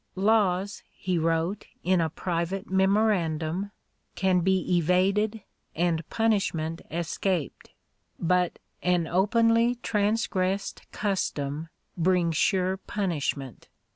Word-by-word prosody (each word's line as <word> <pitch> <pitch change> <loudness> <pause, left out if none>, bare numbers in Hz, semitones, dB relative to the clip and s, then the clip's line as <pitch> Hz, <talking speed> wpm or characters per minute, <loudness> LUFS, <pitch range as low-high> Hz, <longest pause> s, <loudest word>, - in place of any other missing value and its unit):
"Laws," 200 -1 +2
he 185 -3 -2
wrote, 165 +4 0 0.2
in 180 0 +3
a 160 - +1
private 180 +5 -3
memorandum, 190 -3 +1 0.5
"can 190 -1 +2
be 185 0 +1
evaded 195 +5 +2 0.3
and 165 -1 0
punishment 180 -8 0
escaped, 170 0 -2 0.5
but 180 +1 +1 0.2
an 180 -2 +2
openly 230 +6 +3
transgressed 200 -2 0
custom 160 -6 -2 0.3
brings 175 -1 +2
sure 190 +3 +2
punishment. 150 - -3
185 Hz, 90 wpm, -27 LUFS, 165-200 Hz, 0.5 s, in